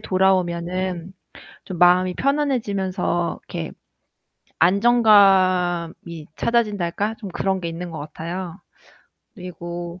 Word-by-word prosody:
돌아오면은 185 Hz, -1 st, 0 dB, 0.5 s
좀 185 Hz, -3 st, -7 dB
마음이 180 Hz, +1 st, +4 dB
편안해지면서 200 Hz, -, -1 dB
이렇게 -, -, -5 dB, 0.9 s
안정감이 185 Hz, -5 st, +3 dB
찾아진달까? 210 Hz, -3 st, 0 dB
좀 205 Hz, -, -7 dB
그런 190 Hz, +1 st, -1 dB
게 170 Hz, -, -3 dB
있는 170 Hz, +2 st, -6 dB
것 160 Hz, -, -7 dB
같아요. 170 Hz, +4 st, -6 dB, 0.8 s
그리고 175 Hz, -2 st, -7 dB
185 Hz, 240 characters per minute, -22 LUFS, 170-200 Hz, 0.9 s, 마음이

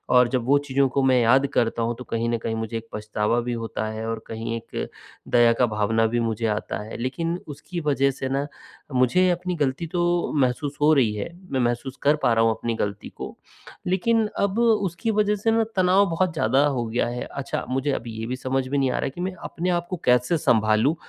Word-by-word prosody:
और 125 Hz, -1 st, +6 dB
जब 125 Hz, -2 st, 0 dB
वो 140 Hz, +2 st, +5 dB
चीज़ों 135 Hz, 0 st, +2 dB
को 135 Hz, +2 st, 0 dB
मैं 130 Hz, -1 st, +4 dB
याद 130 Hz, +4 st, +4 dB
करता 115 Hz, 0 st, +1 dB
हूँ 120 Hz, +1 st, -1 dB
तो -, -, -6 dB
कहीं 115 Hz, 0 st, -2 dB
न 120 Hz, -, +1 dB
कहीं 110 Hz, 0 st, -3 dB
मुझे 110 Hz, 0 st, -4 dB
एक 115 Hz, 0 st, -8 dB
पछतावा 105 Hz, +2 st, 0 dB
भी 120 Hz, 0 st, -3 dB
होता 115 Hz, -1 st, -3 dB
है 110 Hz, +1 st, -5 dB
और 115 Hz, -1 st, -2 dB
कहीं 115 Hz, +1 st, -4 dB
एक 115 Hz, -, -6 dB, 0.4 s
दया 120 Hz, -1 st, +6 dB
का 125 Hz, -, +5 dB
भावना 110 Hz, +1 st, +1 dB
भी 120 Hz, +1 st, 0 dB
मुझे 115 Hz, -1 st, -1 dB
आता 105 Hz, -1 st, -2 dB
है। 110 Hz, -, -8 dB
लेकिन 165 Hz, +8 st, -2 dB
उसकी 170 Hz, +4 st, -6 dB
वजह 140 Hz, -2 st, +2 dB
से 130 Hz, 0 st, -4 dB
न, 140 Hz, +1 st, 0 dB, 0.5 s
मुझे 180 Hz, +9 st, +4 dB
अपनी 180 Hz, +1 st, -2 dB
गलती 145 Hz, +2 st, -1 dB
तो 175 Hz, 0 st, 0 dB
महसूस 140 Hz, +3 st, 0 dB
हो 155 Hz, +1 st, +6 dB
रही 120 Hz, -7 st, +3 dB
है, 105 Hz, -, -4 dB, 0.2 s
मैं 130 Hz, -, 0 dB
महसूस 120 Hz, +2 st, -1 dB
कर 145 Hz, +2 st, +5 dB
पा 120 Hz, -, +4 dB
रहा 115 Hz, 0 st, +3 dB
हूँ 115 Hz, -, +4 dB
अपनी 115 Hz, +1 st, -2 dB
गलती 100 Hz, 0 st, -5 dB
को -, -, -8 dB, 0.5 s
लेकिन 220 Hz, +5 st, +2 dB
अब 200 Hz, +3 st, +1 dB
उसकी 220 Hz, -2 st, +1 dB
वजह 210 Hz, 0 st, +2 dB
से 225 Hz, +3 st, 0 dB
न 225 Hz, 0 st, +3 dB
तनाव 185 Hz, +2 st, +4 dB
बहुत 170 Hz, +1 st, 0 dB
ज़्यादा 135 Hz, 0 st, +3 dB
हो 125 Hz, -4 st, -1 dB
गया 115 Hz, +2 st, 0 dB
है। 120 Hz, +1 st, -4 dB
अच्छा, 140 Hz, -, -4 dB
मुझे 135 Hz, +2 st, 0 dB
अब 120 Hz, -, -3 dB
ये 110 Hz, 0 st, -5 dB
भी 130 Hz, -, -2 dB
समझ 130 Hz, 0 st, -2 dB
में 140 Hz, +2 st, -1 dB
नहीं 130 Hz, -2 st, +2 dB
आ -, -, -1 dB
रहा -, -, -1 dB
कि 175 Hz, +6 st, -8 dB
मैं 185 Hz, +1 st, -2 dB
अपने 180 Hz, +2 st, -3 dB
आप 175 Hz, -, -11 dB
को 185 Hz, -, -3 dB
कैसे 125 Hz, +7 st, +3 dB
संभालूँ 110 Hz, +4 st, +3 dB
130 Hz, 230 wpm, -24 LUFS, 115-165 Hz, 0.5 s, और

